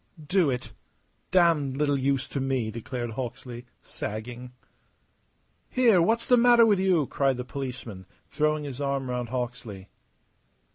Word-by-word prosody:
"Do 180 -1 +2
it! 125 -2 -4 0.6
Damned 160 -7 +3
little 145 -1 +2
use 135 0 0
to 140 - -3
me," 130 -4 -1
declared 120 +1 -5
Hawksley, 125 0 -6 0.2
sagging. 120 +3 -6 1.2
"Here, 235 -8 +4
what's 225 +7 +1
the 250 -2 +5
matter 240 -1 +6
with 205 -4 +3
you?" 185 -6 +3
cried 135 -1 0
the 125 - -5
policeman, 125 -8 -6 0.2
throwing 150 0 0
his 140 -1 -6
arm 140 -2 -1
round 125 -1 -3
Hawksley. 120 -6 -5
135 Hz, 135 wpm, -27 LUFS, 125-155 Hz, 1.2 s, matter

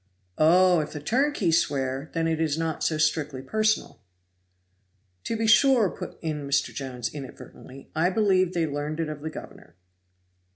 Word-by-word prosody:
"Oh! 180 +2 +5
if 150 0 -4
the 150 - -5
turnkeys 220 - +2
swear, 135 0 -3
then 165 0 +1
it 160 -1 -1
was 155 -2 0
not 165 -1 -2
so 155 - 0
strictly 150 -3 0
personal." 215 - -1 1.2
"To 230 - -2
be 225 - -1
sure," 230 -2 +5
put - - -8
in 150 -3 -3
Mr. 140 0 0
Jones 125 -3 -5
inadvertently, 135 -1 -11
"I 165 +3 +2
believe 185 -3 +2
they 170 -2 +1
learned 150 +1 -4
it 160 -2 -1
of 150 -1 -7
the 160 - -4
governor." 90 - -11
160 Hz, 160 wpm, -26 LUFS, 145-185 Hz, 1.2 s, Oh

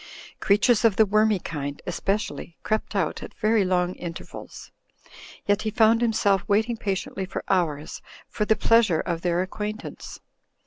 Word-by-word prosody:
Creatures 215 +3 +3
of 225 -4 +4
the 220 - +5
wormy 215 +1 +3
kind, 145 -5 -5
especially, 190 -1 -3
crept 215 0 -2
out 185 -6 -1
at - - -9
very 215 -1 +2
long 180 -1 +1
inter 170 -2 -6
vals; - - -11 0.7
yet 205 +1 +2
he 220 - -1
found 225 +1 +4
himself 205 -4 +2
waiting 220 +3 +2
patiently 195 -2 -3
for - - -5
hours 160 -6 -1 0.3
for - - -2
the 220 +1 +3
pleasure 215 -5 +3
of 170 -2 -3
their 175 0 +1
acquaintance. 210 +3 -6
200 Hz, 150 wpm, -25 LUFS, 180-220 Hz, 0.7 s, the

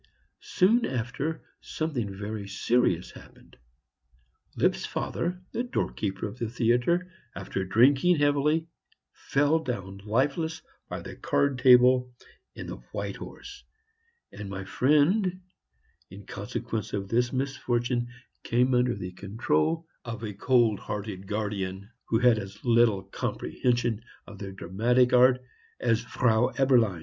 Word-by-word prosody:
Soon 225 +6 +4
after, 130 +6 -3 0.2
something 135 -10 -3
very 100 +1 -5
serious 100 -5 +1
happened. - - -16 1.0
Lipp's - - +2
father, 180 +2 -3
the 235 - -2
doorkeeper 110 - -2
of 105 +5 -10
the 115 - -2
theatre, 125 +10 +1 0.2
after 95 - -3
drinking 135 - +4
heavily, 145 +2 +2 0.5
fell 145 +3 +1
down 100 -9 -5
lifeless 140 +9 0 0.3
by - - -5
the - - -8
card 140 -2 0
table 125 0 +6 0.4
in - - -7
the - - -6 0.2
White - - -4
Horse; 405 0 -10 0.7
and 105 -1 -8
my 100 0 -5
friend, 170 - +2 0.7
in 95 +1 -11
consequence 110 -3 -5
of 100 -1 -2
this 120 +2 +1
misfortune, 125 -2 -1 0.3
came 125 +2 +2
under 125 0 +2
the 90 0 -6
control 100 - -1 0.2
of 115 -2 -6
a 105 -2 -4
cold 115 0 +2
hearted 100 -2 -6
guardian, 100 -1 -3
who 115 - +1
had 120 -2 +4
as 100 0 -9
little 115 -5 +4
comprehension 120 +3 -1 0.2
of 100 0 -12
the 100 -1 -6
dramatic 120 +7 +1
art 125 0 +5 0.4
as 115 -2 +2
Frau 120 -1 +2
Eberlein. 120 -9 +3
120 Hz, 125 wpm, -27 LUFS, 105-135 Hz, 1.0 s, table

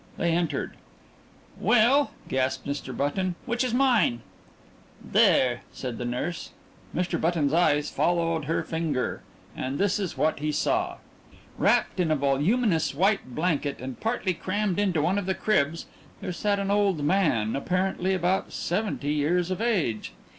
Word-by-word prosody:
They 170 - +1
entered. 165 -4 -1 0.8
"Well," 245 +6 +4 0.2
gasped 130 0 -1
Mr. 140 -3 -4
Button, 175 +6 -1
"which 240 +2 0
is 250 - -1
mine?" 240 - +2 0.8
"There!" 120 -2 +3
said 125 -3 -6
the 120 - -3
nurse. 140 +8 -3 0.5
Mr. 180 +2 -1
Button's 160 -4 +1
eyes 150 -3 +2
followed 165 -3 0
her 165 - 0
pointing 160 -3 -2
finger, 125 - -2 0.3
and 130 +2 -3
this 200 +2 +1
is 190 -4 -3
what 155 -1 +1
he 150 +1 -1
saw. - - 0 0.6
Wrapped - - +2
in 175 -3 +2
a 155 - +3
voluminous 160 - +1
white 190 - +1
blanket, 150 -4 -1
and 130 0 -7
partly 225 -5 -1
crammed 195 +2 -1
into 180 -7 +1
one 190 +5 +2
of 195 - -5
the 190 - 0
cribs, 165 -6 0 0.3
there 180 - -4
sat 200 +4 0
an 200 0 -1
old 200 -7 +2
man 145 - +2
apparently 185 +4 0
about 185 +1 0
seventy 175 -6 -2
years 170 +5 +1
of 185 - -2
age. 180 - 0
170 Hz, 150 wpm, -26 LUFS, 145-195 Hz, 0.8 s, Well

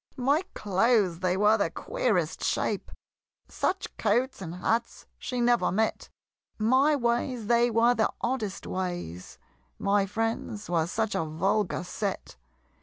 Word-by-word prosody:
My 275 +5 +2
clothes 200 -3 +2
they 185 0 0
were 210 +2 +4
the - - +1
queerest - - -1
shape! - - -1 0.6
Such 380 +1 -2
coats 235 +3 +1
and 170 -2 -6
hats 225 +6 -1
she 250 - -3
never 240 0 +3
met! 220 +4 -1 0.5
My 260 +7 +4
ways 240 -2 -1
they 235 +2 +3
were 235 +1 +4
the 220 -3 +2
oddest 230 -5 -2
ways! 175 - -5 0.4
My 200 0 +2
friends 220 -1 -3
were 165 -2 +2
such 220 +4 -1
a - - 0
vulgar 175 +4 0
set! 195 - -4
220 Hz, 130 wpm, -28 LUFS, 190-240 Hz, 0.6 s, were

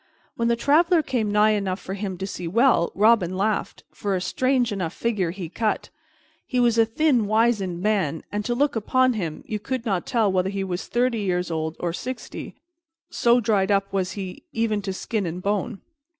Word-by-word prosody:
When 235 - 0
the 235 - +3
traveler 320 +7 +3
came 235 -7 -1
nigh 210 +1 +4
enough 200 -2 -1
for 190 - -6
him 195 -2 -4
to 190 - -4
see 180 -2 -6
him 165 - -5
well, 230 -7 +4
Robin 200 -4 +3
laughed, 210 +2 -1
for 200 -2 -2
a - - 0
strange 255 +4 +1
enough 180 -4 -3
figure 210 -7 0
he 180 0 -5
cut. 215 +6 -2 0.6
He 250 - 0
was 235 -2 +3
a 225 - +5
thin, 245 -2 +2
wizened 210 -5 +1
man, 195 -8 0
and, 210 0 -2
to 240 - 0
look 285 +2 +1
upon 255 +4 +2
him, 170 -8 -4
you 215 - -3
could 255 +3 -4
not 195 -6 -1
tell 220 -5 +2
whether 185 0 +1
he 195 0 -2
was 180 -1 -4
thirty 245 -1 +1
years 180 -3 -1
old 160 0 -3
or 175 -1 -2
sixty, 255 +7 -6 0.6
so 240 +1 +3
dried 205 -4 +1
up 195 -1 +1
was 185 -2 -1
he 190 -2 -6
even 225 -2 0
to 195 - -3
skin 200 +1 -2
and 175 +2 -5
bone. 200 -1 -1
210 Hz, 200 wpm, -24 LUFS, 185-235 Hz, 0.6 s, a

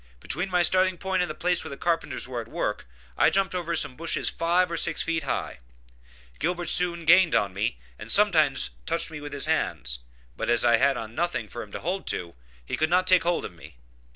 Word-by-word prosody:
Between 180 - -3
my 180 -1 +2
starting 185 +2 +2
point 190 +1 -1
and 180 - -1
the 155 - -5
place 175 +2 +1
where - - -7
the 140 - -7
carpenters 165 -7 -1
were 125 -2 -4
at 115 - -11
work - - -3 0.3
I - - +6
jumped 195 -1 +1
over 170 -2 -2
some 130 - +2
bushes 165 +3 -1
five 170 +2 +1
or - - -1
six - - +2
feet 165 -1 -1
high. 135 - -3 0.8
Gilbert 175 +1 -1
soon 170 -2 +1
gained 175 +1 +6
upon 100 -2 +1
me, 100 - -2 0.2
and - - -4
sometimes - - +3 0.2
touched - - -1
me 150 -2 -7
with 145 0 -7
his 140 0 -1
hands, 60 - -1 0.4
but - - -3
as 120 0 +3
I 120 -1 +5
had 135 +2 +2
on 110 -1 -7
nothing 170 -7 -2
for 120 - -7
him 105 - -10
to - - -5
hold 185 +4 -3
to, 85 -1 -2 0.3
he - - -3
could 155 - +1
not 180 +1 +3
take 185 -2 +5
hold 175 0 0
of 90 - -8
me. 80 -3 -14
165 Hz, 225 wpm, -26 LUFS, 120-180 Hz, 0.8 s, I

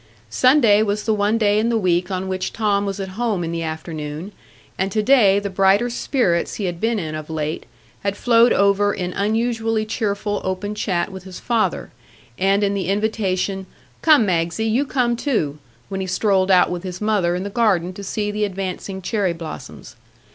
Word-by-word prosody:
Sunday 250 -6 +5
was 210 0 -1
the 220 - +1
one 210 +2 +1
day 210 -1 +3
in 225 +2 +1
the 235 - +1
week 180 -3 +1
on 190 0 -3
which 185 0 -2
Tom 205 -2 0
was 195 0 -4
at 190 -1 -4
home 210 -2 -1
in 165 - -3
the 170 0 -3
afternoon; 160 +2 -5 0.4
and 190 +1 -1
today 215 -2 +4
the 200 0 -2
brighter 195 +5 +3
spirits 235 -9 0
he 205 - -3
had 175 -2 -4
been 230 0 +1
in 160 -6 -4
of 155 0 -6
late 155 -1 -3 0.3
had 200 0 -2
flowed 235 0 +4
over 200 +1 +3
in 180 0 -3
unusually 225 +1 0
cheerful 205 -2 -2
open 190 +2 -3
chat 185 -3 -1
with 190 -1 -9
his 185 -1 -9
father, 230 -2 -1 0.5
and 195 +2 +2
in 200 0 +1
the 195 -3 -2
invitation, 195 -2 -1 0.3
"Come, 305 -8 +5
Magsie, 170 +3 0
you 235 +6 +1
come 245 -3 +1
too!" 190 - -1 0.3
when 195 -1 -4
he 190 - -3
strolled 190 0 +1
out 180 -2 +5
with 175 -1 -3
his 180 -1 -6
mother 205 -5 +1
in 180 - -3
the 200 - -5
garden 190 -6 +1
to 200 - -9
see 210 +1 -2
the 210 0 -2
advancing 190 -1 -4
cherry 200 -4 0
blossoms. 155 -7 -9
200 Hz, 190 wpm, -21 LUFS, 185-215 Hz, 0.5 s, Sunday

